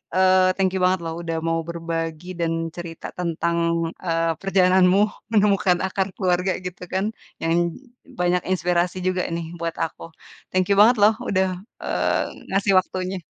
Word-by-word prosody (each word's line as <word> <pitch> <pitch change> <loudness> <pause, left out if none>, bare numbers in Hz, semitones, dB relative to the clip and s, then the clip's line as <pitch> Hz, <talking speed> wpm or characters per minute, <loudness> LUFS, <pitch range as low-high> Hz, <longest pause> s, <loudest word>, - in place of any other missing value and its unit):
eee, 185 0 +5
thank 190 -1 +2
you - - 0
banget 185 0 +3
loh 165 - -3
udah 165 -1 -2
mau 165 0 +1
berbagi 165 0 -4
dan 165 -1 0 0.2
cerita 170 -2 -7
tentang, 170 0 -1 0.5
eee, 165 0 +1
perjalananmu 185 0 +4 0.3
menemukan 195 -4 +3
akar 190 0 -1
keluarga 180 0 +1
gitu 180 0 -6
kan. 190 +2 +1 0.4
Yang 165 0 +1 0.7
banyak 180 0 +2
inspirasi 175 +1 +1
juga 185 -1 0
nih 170 -1 -3
buat 165 0 -3
aku. 165 - -3 0.5
Thank 185 -1 +1
you - - +5
banget 235 +2 +6
loh 215 +1 +7 0.2
udah, 190 -1 +2 0.4
eee, - - 0 0.2
ngasih 195 0 +2
waktunya! 185 0 -4
180 Hz, 150 wpm, -23 LUFS, 170-190 Hz, 0.7 s, loh